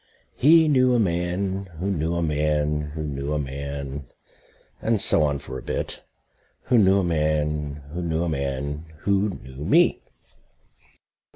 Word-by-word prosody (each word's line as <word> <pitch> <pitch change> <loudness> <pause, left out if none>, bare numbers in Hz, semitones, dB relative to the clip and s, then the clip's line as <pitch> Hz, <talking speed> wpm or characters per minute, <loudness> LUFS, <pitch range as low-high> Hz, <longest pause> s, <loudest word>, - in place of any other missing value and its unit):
He 160 +3 +6
knew 130 -4 +4
a - - +3
man 95 +1 -1
who 95 +4 -2
knew 80 -1 -1
a 85 - 0
man 75 -1 0
who 80 - -3
knew 70 0 -3
a - - 0
man... 70 -1 -5 0.7
and 115 -1 +1
so 85 - +3
on 70 -2 +2
for 65 -1 -7
a - - -10
bit... - - -4 0.6
who 120 - +3
knew 95 -1 +5
a - - -2
man 75 -3 -1
who 90 - -3
knew 85 -1 -1
a - - -1
man 70 +1 -3 0.2
who 100 +1 +2
knew 65 -6 -8
me. - - +4
75 Hz, 155 wpm, -24 LUFS, 70-95 Hz, 0.7 s, He